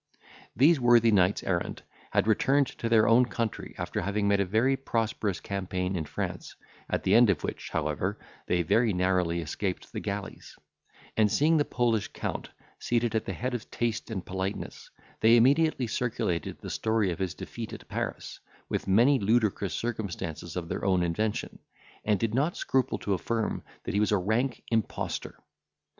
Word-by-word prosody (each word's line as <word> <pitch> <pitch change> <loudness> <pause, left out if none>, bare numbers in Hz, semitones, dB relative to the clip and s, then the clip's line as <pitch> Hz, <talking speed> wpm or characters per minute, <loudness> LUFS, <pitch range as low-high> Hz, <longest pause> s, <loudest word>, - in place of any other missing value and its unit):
These 150 +4 +5
worthy 120 -2 +5
knights 95 -1 +3
errant 85 -2 -2 0.3
had - - +2
returned 135 +6 +3
to 115 - -1
their 110 -1 +5
own 115 +3 +6
country, 115 -2 -4
after - - -3
having 100 +1 0
made 100 0 +3
a 100 - +2
very 115 +8 +2
prosperous 115 -6 -1
campaign 95 -1 -3
in 80 -3 -2
France, - - -5 0.3
at - - -1
the - - +2
end 120 -1 +7
of 90 -6 +1
which, - - -4
however, - - -1 0.3
they 90 -1 +2
very 110 +6 +3
narrowly 90 -2 +1
escaped 90 +4 -4
the - - -3
galleys; 100 0 -6 0.6
and 105 -2 +3
seeing 160 +3 +3
the 145 - +2
Polish 115 -4 +1
Count - - -5 0.3
seated 120 -2 0
at 110 - 0
the - - -3
head 125 +1 -3
of 120 -3 -5
taste 120 -1 -2
and 95 -6 -4
politeness, 95 +1 -4 0.3
they 115 +2 +6
immediately 140 +3 +3
circulated 110 -8 -2
the - - -7
story 110 -4 +1
of 85 - -5
his 95 -3 -2
defeat - - -7
at - - -9
Paris, - - -4 0.3
with - - -2
many 120 +8 +5
ludicrous 105 -2 +1
circumstances 90 -8 -4
of 90 -2 -3
their - - -4
own 95 -2 +2
invention, 105 +6 -2 0.4
and 105 -2 +2
did 115 -2 -1
not 145 +8 +1
scruple 130 -4 0
to 100 - -1
affirm 110 +3 -1 0.2
that - - -4
he 100 - +2
was 105 - +2
a 105 - +4
rank 110 +7 0
impostor. 110 -3 -2
110 Hz, 170 wpm, -28 LUFS, 95-120 Hz, 0.6 s, end